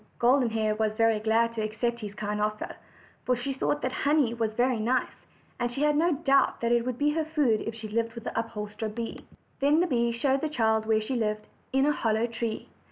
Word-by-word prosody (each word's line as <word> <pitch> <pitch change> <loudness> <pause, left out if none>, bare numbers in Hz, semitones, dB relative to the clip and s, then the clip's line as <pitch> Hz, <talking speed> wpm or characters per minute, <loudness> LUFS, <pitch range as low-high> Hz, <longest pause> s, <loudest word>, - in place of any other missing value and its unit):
Golden 250 0 +3
Hair 215 -1 0
was 215 -1 +1
very 225 -1 +3
glad 225 +2 +2
to 225 - -3
accept 235 +2 -2
this 205 -1 -6
kind 210 0 -3
offer, 215 0 -2 0.5
for 250 - +2
she 270 +3 -3
thought 290 +2 -1
that 255 - 0
honey 280 -3 +2
was 225 -2 -2
very 245 -1 +2
nice; 245 +4 -1 0.3
and 240 0 -1
she 275 +4 -2
had 300 0 +3
no 335 +3 +3
doubt 275 -1 +2
that 235 0 +1
it 240 0 +2
would 250 -2 -2
be 295 +2 +2
her 320 +1 0
food 295 -8 +1
if 225 - -3
she 220 -1 -7
lived 230 +2 -2
with 235 - -7
the - - -5
upholsterer 215 -1 -4
bee. 230 +2 -6 0.4
Then 290 +3 +4
the 355 - +3
bee 235 -7 +1
showed 265 +3 +1
the 310 - -1
child 220 -5 +1
where 220 -1 +3
she 235 +5 -3
lived, 215 -2 -1 0.3
in 270 +1 +3
a 295 - +4
hollow 225 -5 +1
tree. 230 -1 -4
235 Hz, 230 wpm, -28 LUFS, 220-270 Hz, 0.5 s, Then